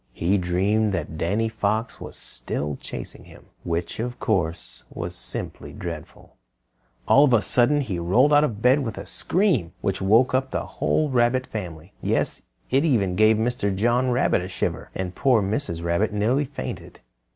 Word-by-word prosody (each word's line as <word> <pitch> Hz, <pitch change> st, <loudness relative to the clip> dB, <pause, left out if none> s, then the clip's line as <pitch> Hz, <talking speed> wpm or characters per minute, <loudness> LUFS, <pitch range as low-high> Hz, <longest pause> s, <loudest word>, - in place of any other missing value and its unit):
He 90 Hz, +9 st, +1 dB
dreamed 100 Hz, +4 st, +1 dB
that 80 Hz, -3 st, -3 dB
Danny 100 Hz, +8 st, 0 dB
Fox 110 Hz, +1 st, -2 dB
was -, -, -8 dB
still 70 Hz, +4 st, -4 dB
chasing -, -, -8 dB
him, -, -, -16 dB, 0.2 s
which, 85 Hz, +3 st, -3 dB
of 120 Hz, +2 st, -4 dB
course, 85 Hz, -6 st, -2 dB
was 85 Hz, +1 st, -5 dB
simply -, -, -5 dB
dreadful. 85 Hz, -3 st, -8 dB, 0.7 s
All 140 Hz, -, +7 dB
of 130 Hz, -, +2 dB
a 115 Hz, -, +5 dB
sudden, 135 Hz, +8 st, +3 dB
he 100 Hz, -10 st, -3 dB
rolled 120 Hz, -, +3 dB
out 145 Hz, 0 st, +6 dB
of 110 Hz, -8 st, -2 dB
bed 130 Hz, +3 st, +5 dB
with 120 Hz, -6 st, -4 dB
a -, -, -6 dB
scream, 165 Hz, -, 0 dB
which 95 Hz, -2 st, -1 dB
woke 110 Hz, +7 st, +4 dB
up 130 Hz, +1 st, +1 dB
the -, -, -3 dB
whole 155 Hz, -2 st, 0 dB
Rabbit 125 Hz, +1 st, +2 dB
Family. 85 Hz, -6 st, -7 dB
Yes, -, -, -1 dB, 0.2 s
it 135 Hz, +3 st, +3 dB
even 105 Hz, -, +2 dB
gave 110 Hz, +2 st, +5 dB
Mr. 110 Hz, -4 st, 0 dB
John 120 Hz, +5 st, +2 dB
Rabbit 120 Hz, -6 st, +2 dB
a 90 Hz, -, -6 dB
shiver, 90 Hz, -, -3 dB
and 95 Hz, -1 st, -3 dB
poor 130 Hz, -1 st, +3 dB
Mrs. 95 Hz, -, -2 dB
Rabbit 85 Hz, +5 st, +1 dB
nearly 115 Hz, +8 st, +1 dB
fainted. 140 Hz, +1 st, -7 dB
110 Hz, 170 wpm, -24 LUFS, 90-125 Hz, 0.7 s, All